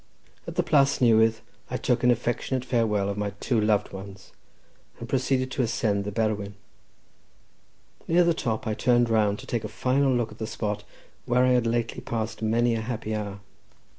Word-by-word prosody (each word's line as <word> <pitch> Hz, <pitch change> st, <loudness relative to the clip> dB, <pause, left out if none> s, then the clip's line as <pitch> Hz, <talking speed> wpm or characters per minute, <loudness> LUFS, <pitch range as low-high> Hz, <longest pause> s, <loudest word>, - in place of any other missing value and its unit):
At -, -, -6 dB
the -, -, +2 dB
Plas 140 Hz, -1 st, +3 dB
Newydd 115 Hz, -2 st, +4 dB, 0.3 s
I -, -, -2 dB
took 125 Hz, 0 st, 0 dB
an 125 Hz, -, +5 dB
affectionate 120 Hz, +2 st, 0 dB
farewell 110 Hz, -5 st, +1 dB
of 100 Hz, 0 st, -3 dB
my 100 Hz, -1 st, -2 dB
two 120 Hz, -4 st, +1 dB
loved 105 Hz, -1 st, +1 dB
ones, 95 Hz, 0 st, -10 dB, 0.7 s
and -, -, -7 dB
proceeded 130 Hz, 0 st, 0 dB
to 135 Hz, -, -1 dB
ascend 110 Hz, -4 st, 0 dB
the 105 Hz, -, -3 dB
Berwyn. 105 Hz, -2 st, -1 dB, 1.5 s
Near 175 Hz, +2 st, +4 dB
the 170 Hz, 0 st, +3 dB
top 115 Hz, -8 st, -2 dB
I 110 Hz, -, -1 dB
turned 120 Hz, +1 st, +2 dB
round 105 Hz, -2 st, +2 dB
to -, -, -10 dB
take 120 Hz, -2 st, -2 dB
a -, -, -3 dB
final 135 Hz, +1 st, +1 dB
look 120 Hz, -3 st, 0 dB
at 110 Hz, -, -13 dB
the 110 Hz, -, -3 dB
spot 105 Hz, -2 st, -3 dB, 0.4 s
where 125 Hz, +1 st, +3 dB
I -, -, +3 dB
had 125 Hz, -2 st, +3 dB
lately 115 Hz, 0 st, -1 dB
passed 110 Hz, -1 st, -4 dB
many 115 Hz, +2 st, +2 dB
a 115 Hz, -, -1 dB
happy 110 Hz, -1 st, -4 dB
hour. 100 Hz, -2 st, -4 dB
115 Hz, 185 wpm, -26 LUFS, 105-125 Hz, 1.5 s, an